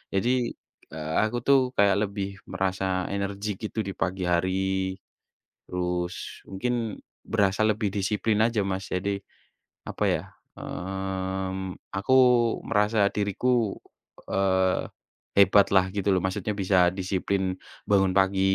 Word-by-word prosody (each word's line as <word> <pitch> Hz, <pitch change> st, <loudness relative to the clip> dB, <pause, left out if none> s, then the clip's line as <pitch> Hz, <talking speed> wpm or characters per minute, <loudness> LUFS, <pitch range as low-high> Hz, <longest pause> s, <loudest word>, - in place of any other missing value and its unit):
Jadi, 115 Hz, +6 st, +2 dB, 0.6 s
eee, 80 Hz, 0 st, -4 dB
aku 110 Hz, +3 st, 0 dB
tuh 140 Hz, -1 st, +5 dB, 0.2 s
kayak 100 Hz, -1 st, +4 dB
lebih 100 Hz, -1 st, -4 dB, 0.2 s
merasa 95 Hz, 0 st, -2 dB, 0.3 s
energik 100 Hz, +1 st, -3 dB
gitu 110 Hz, -, -6 dB
di -, -, -2 dB
pagi 95 Hz, 0 st, -2 dB
hari, 95 Hz, +1 st, 0 dB, 0.7 s
terus 90 Hz, -1 st, -4 dB
mungkin 115 Hz, +2 st, -2 dB, 0.2 s
berasa 100 Hz, -2 st, +1 dB
lebih 110 Hz, -1 st, +1 dB
disiplin 105 Hz, +2 st, 0 dB
aja 115 Hz, -2 st, +1 dB
Mas. 95 Hz, -1 st, -2 dB
Jadi, 100 Hz, +2 st, -1 dB, 0.7 s
apa -, -, -2 dB
ya, -, -, -1 dB, 0.3 s
mmm, 95 Hz, 0 st, -4 dB, 0.2 s
aku 95 Hz, +6 st, -1 dB, 0.5 s
merasa 105 Hz, -1 st, +2 dB
diriku, 105 Hz, +2 st, 0 dB, 0.5 s
eee, 95 Hz, -1 st, +1 dB, 0.5 s
hebat 100 Hz, 0 st, +6 dB
lah 95 Hz, -1 st, +6 dB
gitu 100 Hz, -1 st, -2 dB
loh, 90 Hz, -, +1 dB
maksudnya 100 Hz, +2 st, -1 dB
bisa 95 Hz, -2 st, +4 dB
disiplin, 95 Hz, 0 st, -1 dB, 0.3 s
bangun 95 Hz, -2 st, +4 dB
pagi 95 Hz, 0 st, +3 dB
95 Hz, 115 wpm, -26 LUFS, 95-105 Hz, 0.7 s, hebat